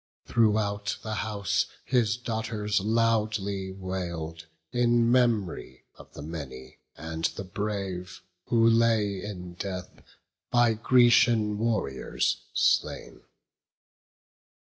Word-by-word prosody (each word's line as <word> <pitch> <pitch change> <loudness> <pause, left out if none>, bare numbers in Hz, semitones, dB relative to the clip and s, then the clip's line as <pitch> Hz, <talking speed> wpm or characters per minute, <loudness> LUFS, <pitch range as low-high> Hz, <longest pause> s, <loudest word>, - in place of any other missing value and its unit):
Throughout 105 -3 +1
the 110 - -4
house 105 -3 -1 0.2
his 115 -3 +2
daughters 110 -3 -2
loudly 105 -3 0
wail'd 85 -4 -5 0.2
In 120 -1 +3
mem'ry 110 - 0
of - - -15
the 70 - -7
many 70 -6 -8 0.2
and 80 +1 -4
the - - -2
brave 95 -2 -4 0.2
Who 115 -1 +3
lay 115 -4 +3
in 90 -4 -7
death, 90 0 -6 0.5
by 120 -2 +4
Grecian 115 -2 +4
warriors 110 - -1
slain. - - +1
105 Hz, 95 wpm, -27 LUFS, 90-115 Hz, 0.5 s, by